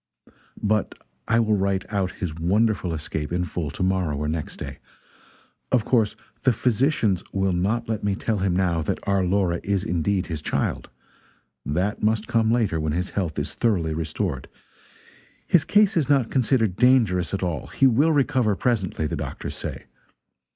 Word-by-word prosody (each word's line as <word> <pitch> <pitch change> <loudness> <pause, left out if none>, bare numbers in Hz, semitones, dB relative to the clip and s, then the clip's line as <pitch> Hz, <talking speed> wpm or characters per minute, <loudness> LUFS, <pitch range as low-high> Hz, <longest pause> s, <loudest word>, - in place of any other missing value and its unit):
But 105 0 +1 0.3
I 115 +1 +3
will 110 -2 +2
write 95 -1 0
out 95 -2 0
his 90 -5 -4
wonderful 95 +3 +1
escape 75 -1 -4
in 90 +1 0
full 85 -4 -3
to 75 - -4
morrow 90 -5 0
or 75 +1 -2
next 80 0 -4
day. - - -7 0.9
Of 120 -5 +2
course 110 -5 +2 0.3
the 130 - +4
physicians 115 - +1
will 95 -1 0
not 105 +7 0
let 110 -2 -2
me 100 -1 +1
tell 110 +1 -1
him 95 -2 +1
now 90 -3 +1
that 75 - -1
our 100 -1 +2
Laura 90 -2 +1
is 100 -1 -1
indeed 90 +1 0
his 80 -4 -5
child - - -2 0.7
that 90 +8 -1
must 110 0 +1
come 115 -2 +2
later, 110 -8 +1
when 75 -1 -1
his 90 +3 -2
health 85 -6 -2
is 75 - -3
thoroughly 90 -9 0
restored. 80 -2 -3 1.0
His 170 -5 +4
case 205 -1 +3
is 155 -5 +1
not 135 -5 +3
considered 115 -7 +1
dangerous 115 -9 +3
at 100 -1 -2
all; 85 -3 -2
he 135 - +1
will 135 +6 +4
recover 130 -7 +2
presently, 95 -9 -1
the - - -2
doctors - - -5
say. - - -6
100 Hz, 170 wpm, -24 LUFS, 85-115 Hz, 1.0 s, the